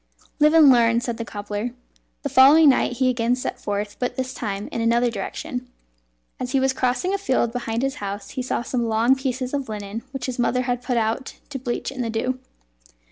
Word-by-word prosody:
"Live 305 +2 +5
and 305 -4 +8
learn," 235 -1 +4
said 235 -1 -3
the 230 - -3
cobbler. 205 +3 -5 0.5
The 285 - -1
following 280 +4 +7
night 255 - +2
he 255 +1 +1
again 240 -1 +2
set 250 - -4
forth, 205 0 -3
but 250 - -2
this 260 0 -3
time 205 -4 -4
in 230 - -2
another 235 +1 +2
direction. 250 +5 -5 0.7
As 250 +1 -4
he 270 - +4
was 265 0 +2
crossing 260 +9 0
a 400 - 0
field 255 - +1
behind 235 -1 -2
his 270 +1 -1
house 200 0 -5
he 260 - -3
saw 250 -1 -2
some 240 -1 -1
long 225 +3 +4
pieces 260 -1 -3
of 275 -4 -2
linen 210 +1 -5
which 270 -1 -5
his 255 -1 -4
mother 250 +1 +1
had 245 -1 -1
put 245 -1 -1
out 225 +4 -1 0.2
to 270 - -4
bleach 245 0 -3
in 265 -2 -5
the 230 - -2
dew. 255 +3 -1
245 Hz, 210 wpm, -23 LUFS, 230-265 Hz, 0.7 s, and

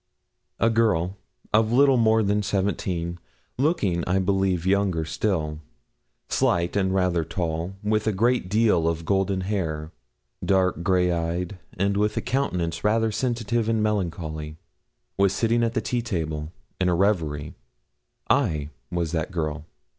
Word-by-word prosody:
A 115 - +3
girl, 100 -6 +2 0.4
of 110 +1 +4
a - - +2
little 135 0 +6
more 110 -2 +4
than 105 +1 +1
seventeen, 95 -4 -1 0.4
looking, 105 - +1
I 90 +2 +2
believe, 95 -2 +1
younger 95 -4 +1
still; 75 -3 -1 0.7
slight 85 +1 +1
and 95 -2 +2
rather 90 -3 +1
tall, 85 +2 -3
with 110 +1 0
a - - +4
great 115 0 +1
deal 105 -6 +3
of 85 0 -1
golden 95 0 +1
hair, 80 -6 -2 0.5
dark 95 -3 +2
grey 90 0 +2
eyed, 85 +2 -2 0.2
and 100 +2 +1
with 105 +1 +1
a - - +1
countenance 90 -12 -1
rather 110 +1 +2
sensitive 115 0 -1
and 110 -1 +1
melancholy, 80 -7 -2 0.6
was 100 -1 +4
sitting 115 +2 +1
at 115 0 -1
the - - +1
tea 120 -1 -1
table, 80 -8 -3 0.3
in 90 -1 +2
a 90 - +2
reverie. 80 -6 0 0.7
I 80 - +1 0.2
was 85 0 -2
that 80 -3 -1
girl. 80 -4 -3
95 Hz, 145 wpm, -25 LUFS, 85-105 Hz, 0.7 s, little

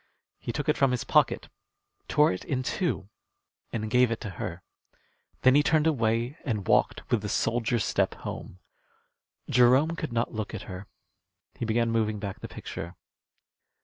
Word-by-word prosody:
He - - -4
took 145 +3 -3
it 150 - +2
from 135 - +4
his 125 -3 -1
pocket, - - +2 0.6
tore 150 -6 +4
it 90 - -6
in 130 -2 -2
two, 160 - -1 0.6
and 110 -2 -2
gave 125 +2 +4
it 115 - -2
to 105 - -5
her. - - -5 0.8
Then 130 - +7
he 145 - +6
turned 155 +1 +3
away 120 -2 +1
and 105 -8 -2
walked - - +2
with 120 - +3
the 105 - -4
soldier's 115 +1 +1
step - - +1
home. 90 - -7 0.9
Jerome 130 +7 +4
could 155 -5 -4
not 115 +1 -1
look 110 0 -4
at 105 - -6
her. 95 0 -8 0.7
He - - -4
began 115 +1 +1
moving 110 -2 +1
back 100 -2 -5
the - - -6
picture. 85 +2 -7
115 Hz, 165 wpm, -28 LUFS, 110-130 Hz, 0.9 s, Then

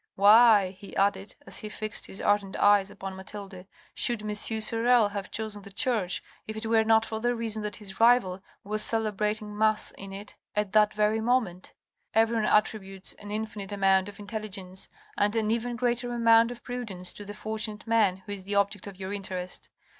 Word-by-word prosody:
" - - -65
Why," 210 -1 +7
he 195 +1 -12
added, 195 0 0
as - - -6
he 215 - -6
fixed 215 0 -5
his 190 - -10
ardent 205 -2 +1
eyes 205 -1 +4
upon 195 -1 -7
Mathilde, 190 -1 -9
" - - -29
should 235 -3 0
M. 210 0 -2
Sorel 225 +1 +2
have 200 -2 -5
chosen 215 -2 -5
the 200 - -11
church, 210 -4 -1 0.2
if 220 0 -5
it 220 - -5
were 225 0 +3
not 220 0 +4
for 220 -1 -4
the 240 +2 0
reason 225 -2 -3
that 210 0 -4
his 195 -2 -9
rival 225 -6 +4 0.2
was 215 +1 -2
celebrating 210 -1 -1
mass 215 0 +1
in 195 0 -10
it 200 +2 -8 0.2
at 210 -2 0
that 215 0 +4
very 210 +1 +2
moment? 225 -7 0 0.4
Everyone 225 -1 +3
attributes 195 -3 +1
an 205 - -9
infinite 210 -2 -4
amount 195 -1 +3
of 205 - -12
intelligence 200 -3 -6 0.3
and 205 +2 +2
an 220 -1 +1
even 235 +1 -1
greater 245 0 -1
amount 230 -1 +5
of 245 -1 -9
prudence 215 -8 -4
to 205 - -9
the 205 +1 -8
fortunate 215 0 -3
man 210 -5 +2
who 205 - -7
is 200 -2 -6
the 200 +2 -3
object 200 0 +1
of 195 -2 -10
your 190 +1 -4
interest. 185 -2 -6
210 Hz, 190 wpm, -28 LUFS, 195-225 Hz, 0.4 s, Why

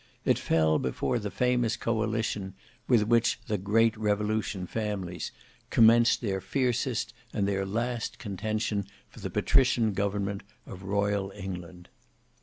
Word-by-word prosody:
It - - +3
fell 80 -1 +2
before 65 - -1
the 105 -1 -4
famous 125 -1 +1
Coalition 110 -4 -1 0.3
with 120 -4 +4
which 115 +1 +3
"the 105 -3 -1
Great 110 +4 +3
Revolution 105 -2 -1
families" 95 -4 -3 0.4
commenced 115 +1 +5
their 95 -5 -1
fiercest 125 +3 -1 0.2
and 100 -2 0
their 95 -1 -1
last 115 +3 -2
contention 105 0 -2 0.2
for - - -14
the - - -4
patrician 125 -5 +3
government 100 0 -1 0.2
of 95 - -9
royal 100 0 0
England. 90 -3 -7
105 Hz, 125 wpm, -28 LUFS, 95-115 Hz, 0.4 s, commenced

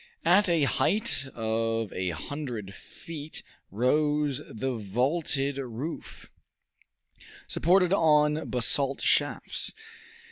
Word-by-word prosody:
At 185 +4 +5
a 165 -3 +3
height 200 - +1
of 115 -1 -1
a 90 0 -1
hundred 115 - -5
feet 155 +7 -8 0.3
rose 145 +5 +1
the 130 +3 -3
vaulted 135 - -1
roof, 130 +5 -6 1.2
supported 180 +2 +3
on 150 -3 +3
basalt 135 +2 +1
shafts. - - 0
140 Hz, 85 wpm, -28 LUFS, 115-155 Hz, 1.2 s, At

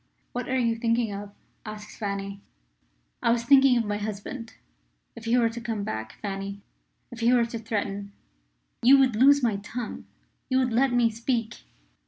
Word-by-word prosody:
"What 245 +1 -4
are 260 - +1
you 230 -2 +2
thinking 230 -1 0
of?" 200 0 -7 0.3
asked 215 -1 -9
Fanny. 200 -1 -4 0.8
"I - - +2
was 235 0 +2
thinking 270 0 +6
of 230 - +1
my 205 0 -1
husband. 220 +3 -6 0.6
If 230 -1 -10
he 230 +2 +3
were 235 -2 +4
to 235 +1 -7
come 225 -3 -3
back, 110 - -4
Fanny 200 0 -5 0.5
if 240 - -9
he 235 +1 +3
were 245 -2 +4
to 230 0 -5
threaten 205 -2 -3 0.4
" - - -47
"You 265 +4 +7
would 260 -4 +3
loose 280 +4 +6
my 220 -4 +2
tongue 220 +3 -6 0.4
you 260 - +2
would 255 -3 +1
let 260 +3 +3
me 240 -2 +3
speak?" 230 0 -3
230 Hz, 180 wpm, -26 LUFS, 205-245 Hz, 0.8 s, You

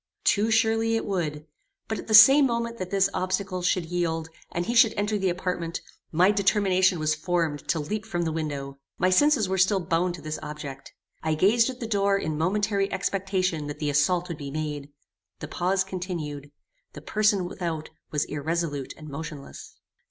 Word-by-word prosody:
Too 215 +2 +2
surely 225 0 +2
it 225 - -1
would; 155 -6 -3 0.4
but, 220 - -3
at - - -9
the 220 - +4
same 270 +6 +9
moment 235 -1 -3
that 185 -1 -4
this 195 0 +3
obstacle 185 0 -2
should 180 -1 +1
yield, 165 -2 -2 0.2
and 175 +1 -2
he 235 - -2
should 230 -2 +5
enter 205 +1 0
the 190 -1 +1
apartment, 175 -2 -3 0.3
my 180 +5 +4
determination 190 -2 +2
was 155 -1 +1
formed 160 -2 -2
to 160 - +1
leap 210 +9 -4
from 175 -5 -2
the 160 - -1
window. 140 -3 -4 0.2
My 185 +1 +2
senses 280 0 +4
were 190 0 -1
still 190 +2 +4
bound 175 0 0
to 170 - -11
this 155 0 -4
object. 140 -2 -8 0.3
I 160 -1 0
gazed 230 +9 +4
at 255 -1 -7
the 235 - -4
door 200 -2 +2
in 155 -5 -3
momentary 195 +4 0
expectation 190 -4 -1
that 145 0 -6
the 150 -1 -1
assault 170 +5 +2
would 170 -4 -6
be 140 -1 -6
made. 150 -1 -4 0.5
The 150 - -7
pause 185 +4 0
continued. 170 -7 -5 0.4
The - - -9
person 210 -3 +1
without 165 -4 -4 0.2
was 150 -1 0
irresolute 150 -2 -3
and 155 - -11
motionless. 150 -1 -8
180 Hz, 180 wpm, -26 LUFS, 155-200 Hz, 0.5 s, same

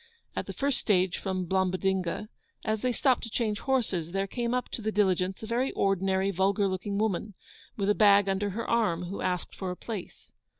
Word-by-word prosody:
At - - -3
the - - -5
first 280 -1 0
stage 185 -3 +2
from 185 -2 -2
Blombodinga, 190 +1 0 0.4
as 215 -1 0
they 250 - +1
stopped 255 +1 +2
to 230 - -6
change 215 -2 -1
horses, 195 -11 0
there 195 0 +1
came 235 +4 -2
up 250 0 0
to - - -5
the 220 0 -1
diligence 190 -1 +1
a - - -2
very 240 +4 0
ordinary, 195 0 +1
vulgar 195 +2 +2
looking 195 +2 -2
woman, 210 -1 -1 0.4
with 200 -2 0
a 205 - +5
bag 205 -1 +6
under 195 +1 0
her 220 +4 -4
arm, 180 -7 +1
who 180 +3 -5
asked 180 -1 -2
for 190 - -4
a 180 - -3
place. 210 -6 -7
200 Hz, 200 wpm, -29 LUFS, 185-220 Hz, 0.4 s, bag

